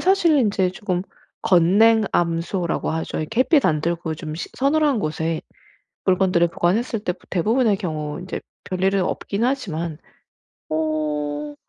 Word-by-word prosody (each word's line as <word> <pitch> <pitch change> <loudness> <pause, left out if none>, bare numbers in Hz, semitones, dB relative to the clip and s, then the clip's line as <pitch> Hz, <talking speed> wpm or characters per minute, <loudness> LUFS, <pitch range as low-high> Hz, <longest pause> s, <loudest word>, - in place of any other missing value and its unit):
사실 350 -5 +4
인제 200 -6 +2
쪼금 185 -1 -2 0.4
건냉암소라고 180 -2 +2
하죠. 160 0 -3
이 - - -4
햇빛 280 +3 +4
안 155 -1 +2
들고 170 -1 -2
좀 155 -1 -6
시 165 - -5
서늘한 285 -1 +2
곳에 160 -1 -2 0.6
물건들을 185 -2 +3
보관했을 215 +8 0
때 180 -3 -1 0.2
대부분의 220 +4 +2
경우 155 -3 -4
이제 185 - -5 0.2
별일은 190 +1 +1
없긴 200 +4 -2
하지만 170 - -2 0.7
어 150 -2 -2
180 Hz, 270 characters per minute, -22 LUFS, 160-215 Hz, 0.7 s, 사실